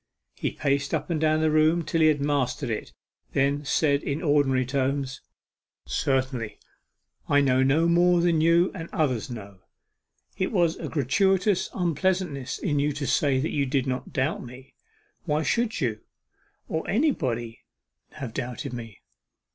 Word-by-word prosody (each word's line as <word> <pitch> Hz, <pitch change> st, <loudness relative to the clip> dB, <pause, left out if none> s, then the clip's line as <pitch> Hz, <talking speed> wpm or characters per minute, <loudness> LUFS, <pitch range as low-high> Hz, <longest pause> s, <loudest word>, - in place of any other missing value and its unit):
He -, -, -2 dB
paced 140 Hz, 0 st, -1 dB
up -, -, -3 dB
and 155 Hz, -2 st, -1 dB
down 155 Hz, 0 st, +2 dB
the 160 Hz, -1 st, +2 dB
room 155 Hz, +2 st, +3 dB
till 165 Hz, +2 st, 0 dB
he 155 Hz, -, +6 dB
had 150 Hz, -2 st, +2 dB
mastered 140 Hz, -3 st, 0 dB
it; -, -, -4 dB, 0.4 s
then 140 Hz, +2 st, +1 dB
said 140 Hz, 0 st, +2 dB
in 145 Hz, +5 st, -3 dB
ordinary 140 Hz, -4 st, +2 dB
tones 135 Hz, 0 st, -1 dB, 0.6 s
'Certainly, 130 Hz, -5 st, -1 dB, 0.7 s
I 145 Hz, -, +5 dB
know 130 Hz, -2 st, +3 dB
no 145 Hz, +5 st, +3 dB
more 175 Hz, +1 st, +4 dB
than 170 Hz, -2 st, +2 dB
you 170 Hz, +3 st, +4 dB
and 165 Hz, -3 st, -7 dB
others 135 Hz, -, 0 dB
know 100 Hz, -5 st, -9 dB, 0.8 s
it 185 Hz, -, -1 dB
was 175 Hz, -6 st, +2 dB
a -, -, -5 dB
gratuitous 190 Hz, -, +2 dB
unpleasantness 175 Hz, -5 st, -1 dB
in 145 Hz, -6 st, -1 dB
you 145 Hz, +1 st, +1 dB
to 145 Hz, 0 st, -4 dB
say 135 Hz, +1 st, +2 dB
you 140 Hz, 0 st, 0 dB
did 135 Hz, -1 st, 0 dB
not 130 Hz, -1 st, -3 dB
doubt 135 Hz, +4 st, -1 dB
me. 125 Hz, +2 st, -12 dB, 0.5 s
Why 155 Hz, -1 st, 0 dB
should 235 Hz, +5 st, 0 dB
you, 115 Hz, -5 st, -1 dB, 0.7 s
or 160 Hz, -, -3 dB
anybody, 130 Hz, -, 0 dB, 0.5 s
have 135 Hz, -7 st, -7 dB
doubted 125 Hz, 0 st, -4 dB
me? 115 Hz, -4 st, -8 dB
145 Hz, 150 wpm, -26 LUFS, 130-165 Hz, 0.8 s, he